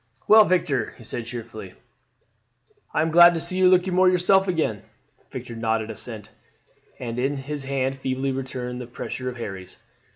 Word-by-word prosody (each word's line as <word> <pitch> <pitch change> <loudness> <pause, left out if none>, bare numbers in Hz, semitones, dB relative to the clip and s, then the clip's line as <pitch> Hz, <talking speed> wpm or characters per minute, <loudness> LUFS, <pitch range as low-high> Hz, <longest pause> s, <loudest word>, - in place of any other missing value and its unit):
"Well, 215 0 +8
Victor," 155 - 0
he - - -13
said 115 +1 -6
cheerfully, 115 -5 -8 1.2
"I 155 - +1
am 160 - -1
glad 175 +1 +8
to - - -1
see 185 +3 -2
you 185 -1 +6
looking 185 0 +3
more 185 +1 +5
yourself 185 +2 +3
again." 155 - -1 0.5
Victor 115 - -7
nodded 110 -1 -1
assent, 110 -1 -7 0.7
and 120 -1 -5
his 140 +2 -3
hand 135 0 -1
feebly 130 +1 -2
returned 125 -2 -5
the 120 - -8
pressure 125 +1 -5
of 125 - -8
Harry's. 95 -5 -7
130 Hz, 160 wpm, -24 LUFS, 115-175 Hz, 1.2 s, Well